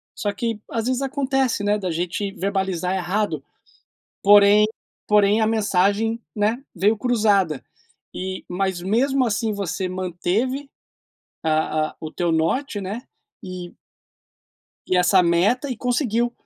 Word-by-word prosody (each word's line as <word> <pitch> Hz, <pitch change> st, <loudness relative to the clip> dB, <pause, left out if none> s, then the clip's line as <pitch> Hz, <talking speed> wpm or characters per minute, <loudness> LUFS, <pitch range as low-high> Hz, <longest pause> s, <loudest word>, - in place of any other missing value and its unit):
só 205 Hz, -, -1 dB
que 225 Hz, +1 st, -3 dB
às 230 Hz, 0 st, -1 dB
vezes 255 Hz, +1 st, 0 dB
acontece, 270 Hz, -4 st, 0 dB
né, 205 Hz, +1 st, +2 dB
da 185 Hz, -4 st, -3 dB
gente 180 Hz, +4 st, -2 dB
verbalizar 190 Hz, -2 st, -1 dB
errado. 190 Hz, +3 st, -1 dB, 0.8 s
Porém 205 Hz, +1 st, +7 dB, 0.4 s
porém 210 Hz, 0 st, +4 dB
a 220 Hz, -, +3 dB
mensagem, 215 Hz, +1 st, +1 dB, 0.2 s
né, 220 Hz, +5 st, 0 dB
veio 205 Hz, +5 st, +2 dB
cruzada 205 Hz, -, +2 dB, 0.5 s
e 185 Hz, 0 st, -5 dB
mas 185 Hz, 0 st, -1 dB
mesmo 255 Hz, +8 st, +2 dB
assim 220 Hz, -1 st, 0 dB
você 190 Hz, -2 st, -3 dB
manteve, 185 Hz, -, -2 dB, 0.7 s
a 155 Hz, 0 st, +1 dB
a -, -, -23 dB
o 155 Hz, -, -6 dB
teu 175 Hz, 0 st, -1 dB
norte, 200 Hz, -, 0 dB
né, 205 Hz, +6 st, -5 dB, 0.4 s
e 180 Hz, -1 st, -7 dB, 1.1 s
e 185 Hz, -, +1 dB
essa 180 Hz, +1 st, +5 dB
meta 190 Hz, +11 st, +2 dB
e 255 Hz, -, -2 dB
conseguiu. 240 Hz, -1 st, 0 dB
205 Hz, 130 wpm, -22 LUFS, 185-230 Hz, 1.1 s, Porém